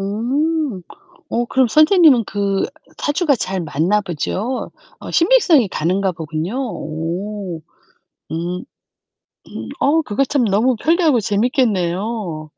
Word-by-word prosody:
음. 250 - -1 0.5
어 240 +1 0
그럼 260 0 +2
선생님은 310 - +5
그 200 -2 -1 0.3
사주가 295 0 +1
잘 190 -4 -3
맞나 170 +6 +1
보죠? 200 - -3 0.3
어, - - -8
신빙성이 335 - +4
가는가 185 +3 0
보군요. 160 +4 -4
오. 180 - -5 0.7
음. 175 +3 -3 0.8
음 - - -7
어 315 +3 +3
그것 270 +1 -1
참 280 -4 +1
너무 225 +5 +2
편리하고 320 +1 +2
재밌겠네요. 205 - -1
210 Hz, 220 characters per minute, -19 LUFS, 180-270 Hz, 0.8 s, 선생님은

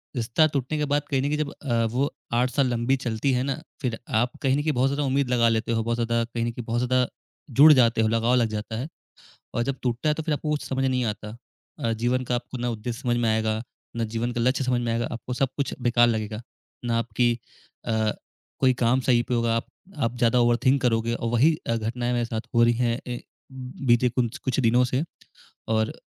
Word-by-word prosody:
रिश्ता 120 +6 +2
टूटने 140 0 -2
के 150 - 0
बाद 145 - +3
कहीं 135 -2 +1
न - - -3
कहीं 150 - 0
जब 150 -2 -2
अ, 120 -4 -1
वो 125 +6 0 0.2
8 125 +2 +2
साल 140 -1 +2
लंबी 120 +3 +1
चलती 115 +4 0
है 125 0 +1
ना, 135 -1 -3 0.2
फिर 120 -4 -2
आप 120 0 +1
कहीं 135 -2 +2
न - - 0
कहीं 155 +1 +1
बहुत 130 +1 +2
ज़्यादा 145 +1 -1
उम्मीद 135 -1 +1
लगा 120 -2 +3
लेते 115 +1 0
हो, 115 -1 +1
बहुत 115 +1 0
ज़्यादा 115 0 +1
कहीं 115 0 -3
न 120 - -1
कहीं 120 0 -7
बहुत 120 +1 -1
ज़्यादा 130 0 +2 0.5
जुड़ 155 +2 +10
जाते 115 -4 +4
हो, 110 - +3
लगाव 115 +2 +2
लग 120 -2 +3
जाता 110 +1 -4
है 130 +5 -3 0.7
और 120 - +1
जब 135 +2 -2
टूटता 125 +3 -1
है 150 - +3
तो 160 - -4
फिर 155 -1 0
आपको 150 +1 -3
कुछ 150 -1 -1
समझ 135 0 -1
नहीं 130 -1 +1
आता 105 +1 -10 0.4
अ, 115 - 0
जीवन 120 +3 0
का 125 - -1
आपको 120 +1 -4
ना 120 0 -1
उद्देश्य 115 +2 -5
समझ 120 -3 +1
में 120 -1 +1
आएगा, 110 0 0 0.3
ना 115 - 0
जीवन 115 +2 -2
का 120 - -2
लक्ष्य 130 +3 +1
समझ 125 -1 +1
में 120 -1 -1
आएगा, 115 +1 -1
आपको 120 +1 -6
सब 135 +1 +1
कुछ 140 - -2
बेकार 120 -1 +4
लगेगा। 110 -1 -2 0.4
ना 115 -1 +1
आपकी 120 +1 +1 0.5
अ, 110 -1 +1 0.5
कोई 130 -1 +5
काम 120 +3 +3
सही 120 -2 +3
पे 125 - 0
होगा, 115 -1 +1
आप 115 - -2 0.3
आप 120 -3 -1
ज़्यादा 120 +1 +3
ओवरथिंक 120 +3 +3
करोगे 115 -1 +1
और 115 - -3
वही 135 +7 +4
अ, 115 - +1
घटनाएँ 120 +2 -2
मेरे 120 -1 +1
साथ 115 -1 -3
हो 115 - +5
रही 120 0 +3
हैं 120 0 +1 0.2
अ, - - -8 0.7
बीते 120 +1 +4
कुँछ 120 -1 -1
कुछ 130 +1 -1
दिनों 120 +1 +4
से 130 +5 0 0.7
और 110 0 0
120 Hz, 235 wpm, -25 LUFS, 115-130 Hz, 0.7 s, जुड़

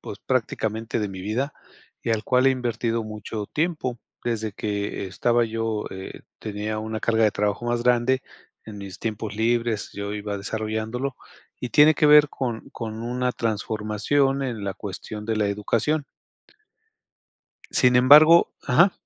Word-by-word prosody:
pues, - - -8
prácticamente 110 +1 -1
de 105 - -1
mi 95 -1 -7
vida, 120 +9 -2 0.5
y - - -1
al 110 -1 +1
cual 125 +2 +3
he - - +6
invertido 115 -2 -1
mucho 105 -1 -6
tiempo 150 -7 -1 0.3
desde 110 -3 -2
que 100 -1 -3
estaba 120 +6 +1
yo 115 -1 -2
eh, 95 0 -8 0.2
tenía 105 0 -4
una 110 0 -4
carga 115 -1 +2
de 105 - +4
trabajo 105 +3 -1
más 120 0 0
grande. 125 +1 +2 0.4
En 110 -2 -9
mis 100 -2 -8
tiempos 110 -2 -4
libres 115 -1 0
yo 100 0 -5
iba 105 -1 -4
desarrollándolo, 110 +5 -3 0.4
y 125 - -4
tiene 150 +1 +6
que 150 - +3
ver 150 0 +8
con 120 -5 -4
con 110 -1 -6
una 125 +1 -1
transformación 115 +6 0
en 115 -5 -4
la 100 -1 -3
cuestión 105 +1 -7
de 110 0 -1
la 105 -1 +1
educación. 115 +9 0 1.7
Sin 125 -1 +4
embargo, 150 +7 +8 0.2
ajá. 170 +8 +5
115 Hz, 150 wpm, -24 LUFS, 105-125 Hz, 1.7 s, ver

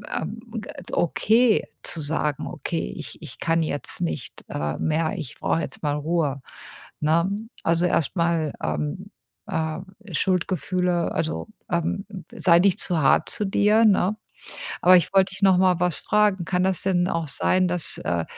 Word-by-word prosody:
ähm, 210 +8 -4 0.2
äh, - - -9
okay 220 +7 +3
zu 165 - -1
sagen: 150 -1 -1
„Okay, 60 - -4
ich - - -8
ich - - -9
kann 165 0 +1
jetzt 145 -2 -3
nicht, 80 -3 -4
äh, 75 0 -3
mehr, 160 +2 0
ich 130 -9 -7
brauche 165 - +1
jetzt - - -5
mal 145 -1 0
Ruhe“, 150 -2 -1 0.6
ne? 165 +4 +2 0.3
Also, 170 +1 +2
erstmal, 165 -2 0
ähm, 75 -1 -3 0.4
äh 160 0 -2 0.3
Schuldgefühle, 180 0 0
also, 160 0 -2 0.2
ähm 170 +3 -1 0.3
sei 170 -2 +4
nicht 190 -1 +3
zu 170 -3 +1
hart 135 - +4
zu 210 - -1
dir, 210 +3 +3
ne? 200 -1 +3 0.7
Aber 185 +1 +7
ich 175 - -1
wollte 195 0 +4
dich 195 - -10
nochmal 185 -2 +4
was 180 -2 +2
fragen: 205 -4 +2
Kann 180 0 0
das 190 -2 0
denn 180 -1 +1
auch 165 -2 -2
sein, 185 +5 +1
dass, 175 -2 -1
äh 85 -1 -1
170 Hz, 155 wpm, -24 LUFS, 155-190 Hz, 0.7 s, Aber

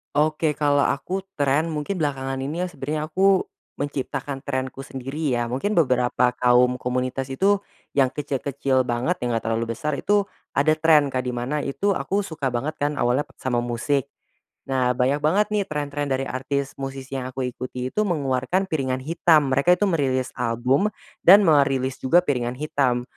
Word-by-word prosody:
Oke, 155 +1 +2
kalau 145 -1 +2
aku 190 +7 -2
tren, 145 +1 +1
mungkin 150 +6 -3
belakangan 135 -4 -2
ini 145 +6 -3
ya 180 - 0
sebenernya 150 0 -4
aku 190 +2 +3 0.3
menciptakan 140 -1 -4
trenku 130 0 -3
sendiri 135 +3 -3
ya. 120 -1 -1
Mungkin 135 - -1
beberapa 125 -6 +2
kaum 125 0 +4
komunitas 130 +1 -2
itu, 200 +8 +3 0.4
yang 135 -2 +3
kecil-kecil 135 -2 -1
banget, 125 +9 -1
yang 120 - 0
enggak 115 0 -1
terlalu 115 0 -1
besar, 150 +4 -3
itu 205 +8 +2 0.3
ada 155 +3 +3
tren 155 -3 +4
Kak, 130 -1 -2
di 125 - -2
mana 130 +5 -2
itu 170 +9 -1
aku 200 +2 -1
suka 160 -9 -3
banget 145 +6 -2
kan 145 +1 0
awalnya 130 0 +1
p - - -23
sama 125 -2 0
musik. 120 +3 0 0.6
Nah, 130 -2 +2
banyak 135 +3 +2
banget 195 +8 +3
nih 210 -1 +2
tren-tren 145 -1 -3
dari 135 0 0
artis 140 +1 -2
musisi 135 0 -5
yang 130 -1 -4
aku 130 +1 -4
ikuti 125 0 -5
itu - - -3
mengeluarkan 150 +2 0
piringan 130 -5 -1
hitam. 155 -2 +3
Mereka 165 +7 +4
itu 205 - +2
merilis 130 -6 0
album 125 - +1 0.4
dan 195 +4 +9
merilis 135 -4 +3
juga 170 +7 +4
piringan 125 -4 -1
hitam. 135 -4 0
135 Hz, 170 wpm, -23 LUFS, 130-155 Hz, 0.6 s, dan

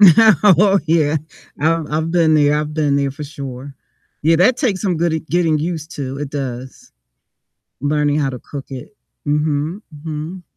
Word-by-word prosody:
Oh 200 0 +6
yeah, 155 -1 +2 0.4
I've 160 0 +1
I've 155 +2 -1
been 165 -3 +3
there, 145 -1 +4
I've 150 0 -5
been 150 -2 +1
there 140 -1 0
for 145 +2 -7
sure. 140 -2 -8 0.5
Yeah, 165 +2 +4
that 200 +9 +4
takes 225 -9 0
some 185 -5 0
good 170 0 +1
at 160 0 -3
getting 165 -3 +2
used 160 0 -4
to, 135 -1 -4
it 145 -1 -5
does. 130 -2 -6 0.9
Learning 145 0 +1
how 140 -3 0
to 125 - -7
cook 140 +2 -8
it. 135 +10 -9 0.3
Mhm, 150 +5 -1
mhm. 155 +4 -6
155 Hz, 165 wpm, -18 LUFS, 145-170 Hz, 0.9 s, Oh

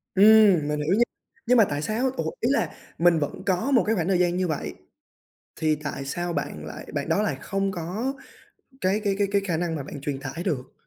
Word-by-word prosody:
Ừm, 200 -6 +6
mình 150 0 -1
hiểu 155 +5 +1
nha, 240 - +6 0.4
nhưng 250 +1 +5
mà 225 - +8
tại 145 0 -2
sao? 225 +9 0
Ủa, - - -1
ý - - +1
là - - 0 0.2
mình 170 -1 +4
vẫn 145 +4 -4
có 190 +7 +1
một 250 -4 +5
cái 225 - +1
khoảng 175 -4 -1
thời 190 -2 +2
gian 175 0 +2
như 185 0 +1
vậy 80 - -3 0.8
thì 155 -1 +2
tại 140 -2 -4
sao 175 +5 -3
bạn - - -4
lại - - -8
bạn - - -2
đó 210 - +2
lại 215 - -1
không 195 -1 -1
có 190 +9 -3 0.7
cái 190 +3 +1
cái 200 -1 +2
cái 200 -1 +2
cái 200 0 +3
khả 175 -5 0
năng 170 0 -1
mà 145 - -4
bạn 145 +1 -8
truyền 140 -1 -3
tải 140 +5 -5
được? 130 -3 -2
175 Hz, 230 wpm, -25 LUFS, 150-205 Hz, 0.8 s, mà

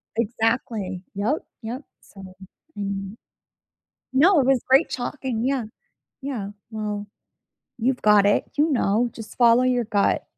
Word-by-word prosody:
Exactly, 225 -4 -1
yep, 225 +10 -1 0.2
yep 240 +5 -5 0.2
so 190 -2 -13 0.4
and 200 +1 -4 1.0
No, 320 +4 +5
it 260 - +1
was 265 -3 +4
great 265 +1 +5
talking 245 -2 -3
yeah, 265 -3 0 0.6
yeah, 235 -8 -4 0.2
well, 210 -1 -4 0.7
you've 245 +2 0
got 210 -1 +6
it. 205 - +3
You 305 +2 +3
know. 235 -2 +2
Just 225 -2 -10
follow 240 0 +5
your 250 -2 +2
gut. 205 -2 +1
230 Hz, 125 wpm, -24 LUFS, 205-255 Hz, 1.0 s, got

